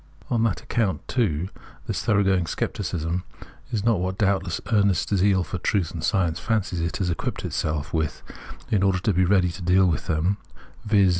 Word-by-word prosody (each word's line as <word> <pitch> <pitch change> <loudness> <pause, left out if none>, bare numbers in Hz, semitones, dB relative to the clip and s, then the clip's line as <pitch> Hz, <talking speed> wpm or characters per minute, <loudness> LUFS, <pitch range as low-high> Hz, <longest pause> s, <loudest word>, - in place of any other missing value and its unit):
On 120 -2 +2
that 115 -5 0
account, 110 -5 -1
too, 95 - 0 0.4
this - - -2
thoroughgoing 95 -4 +2
scepticism 85 +3 -2 0.5
is 105 -4 -1
not 115 -5 +3
what 95 +1 -2
doubt 100 -1 +3
Introduction 90 -3 -4
79 115 - +1
less - - +4 0.2
earnest 105 - +1
zeal 95 0 +3
for 90 - -4
truth 90 -2 0
and 80 -3 -6
science 85 -4 +1
fancies 100 -6 -1
it 85 0 -1
tas 95 -3 -1
equipped 85 - -3
itself 75 -1 -2
with 80 -3 -1 0.5
in 105 - +3
order 95 -1 +3
to 95 +3 +1
be 90 +1 +3
ready 90 -1 +3
to 95 - -9
deal 90 +2 +4
with 80 -5 0
them, 85 +5 +1 0.3
— - - -24
viz. 100 -3 +4
95 Hz, 200 wpm, -24 LUFS, 85-100 Hz, 0.5 s, less